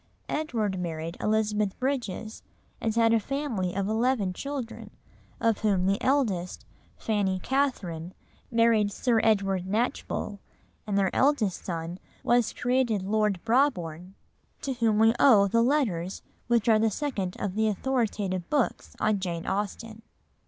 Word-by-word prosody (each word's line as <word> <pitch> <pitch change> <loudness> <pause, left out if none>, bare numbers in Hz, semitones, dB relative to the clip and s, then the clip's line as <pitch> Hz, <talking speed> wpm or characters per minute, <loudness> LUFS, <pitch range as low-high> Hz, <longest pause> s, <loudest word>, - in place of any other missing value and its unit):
Edward 225 -11 -1
married 165 -1 -4
Elizabeth 210 -2 0
Bridges, 240 -5 -3 0.4
and 225 -1 -1
had 230 -1 +4
a 230 - +4
family 225 -8 -2
of 195 0 -1
eleven 220 -3 +1
children, 275 +1 -6 0.5
of 225 -3 +1
whom 195 -4 +1
the 195 +2 +1
eldest, 220 -11 0 0.3
Fanny 200 -4 0
Catherine, 185 - -2 0.3
married 230 -3 +3
Sir 235 +1 +1
Edward 195 -4 +1
Knatchbull, 210 -1 -2 0.5
and 200 -1 0
their 195 -2 +1
eldest 260 -9 +2
son 170 0 -4 0.2
was 240 -1 +3
created 245 -5 0
Lord 210 -2 +1
Brabourne; 190 - 0 0.5
to 270 - -1
him 230 -4 +1
we 225 +1 +5
owe 210 -8 +6
the 230 +4 +2
Letters 225 - 0 0.2
which 235 -2 +2
are 220 -2 +5
the 225 0 +3
second 205 -7 -3
of 200 -3 -2
the 220 +2 +1
authoritative 210 -5 -1
books 285 -6 -1
on 215 -2 +1
Jane 170 -3 -4
Austen. 215 +3 -3
215 Hz, 135 wpm, -27 LUFS, 190-240 Hz, 0.5 s, owe